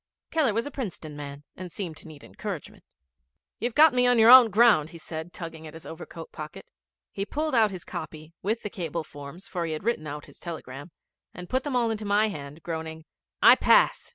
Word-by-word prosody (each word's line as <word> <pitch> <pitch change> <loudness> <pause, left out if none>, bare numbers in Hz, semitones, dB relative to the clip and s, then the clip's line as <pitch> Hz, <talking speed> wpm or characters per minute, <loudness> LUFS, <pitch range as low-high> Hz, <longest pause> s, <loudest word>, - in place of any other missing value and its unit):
Keller 290 -10 +2
was 230 - 0
a 290 - -6
Princeton 175 - -6
man, 145 -1 -8
and 185 - -7
he - - -8
seemed 175 -3 -6
to - - -10
need 150 -3 -13
encouragement. 195 -8 -7 0.8
'You've 235 +1 -2
got 310 -1 +7
me 250 0 +3
on 245 -1 +4
your 225 +1 +8
own 255 -3 +10
ground,' 210 -8 +5
said 160 0 -6
he, - - -17
tugging 165 -2 -8
at 155 - -11
his 165 - -11
overcoat 180 - -9
pocket. - - -9 0.4
He 195 - -3
pulled 305 +8 -2
out 225 -3 +4
his 185 -3 -8
copy, 155 0 -8
with 220 +4 -2
the 210 - -5
cable 170 -2 -4
forms 145 +5 -11
for 175 -2 -3
he 165 -1 -2
had 155 - -5
written 205 -9 -1
out 145 0 -6
his - - -15
telegram 145 -3 -8 0.5
and 180 +1 -8
put 260 +1 +1
them 290 -3 -3
all 235 -2 +2
into 215 -1 -4
my 205 +2 +3
hand, 145 -3 -8
groaning, 160 -1 -5 0.4
'I - - +9
pass. - - +4
180 Hz, 215 wpm, -26 LUFS, 155-230 Hz, 0.8 s, own